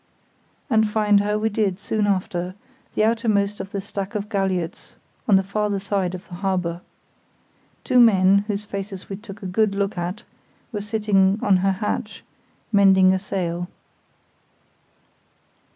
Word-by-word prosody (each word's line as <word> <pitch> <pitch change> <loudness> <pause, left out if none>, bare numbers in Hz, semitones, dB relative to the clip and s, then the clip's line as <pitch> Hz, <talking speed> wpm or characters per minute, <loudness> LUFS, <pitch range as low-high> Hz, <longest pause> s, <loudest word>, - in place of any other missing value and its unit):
And 220 -4 +3
find 210 -1 +3
her 210 +1 0
we 220 +1 0
did 205 -3 0
soon 210 0 -1
after, 185 -2 -1 0.4
the - - +2
outermost 215 -3 +1
of 195 - -6
the 200 - -4
stack 200 0 -5
of 210 0 -3
galliots, 190 -5 -2 0.3
on 205 - +5
the 190 - +4
farther 205 +1 -1
side 195 -2 -1
of 180 - -10
the 175 - -12
harbour. 180 -2 -2 1.0
Two 255 -2 +3
men, 195 -4 +6
whose 210 -1 -3
faces 195 -1 -6
we 195 - -4
took 205 0 -11
a - - -5
good 200 +2 +1
look 200 -2 -1
at, 180 +5 -4 0.5
were 210 -3 -3
sitting 205 -2 +2
on 195 -2 +4
her 195 +1 +1
hatch, 205 +2 -4 0.5
mending 190 -2 +5
a 190 - 0
sail. 175 -3 -3
200 Hz, 150 wpm, -23 LUFS, 190-210 Hz, 1.0 s, men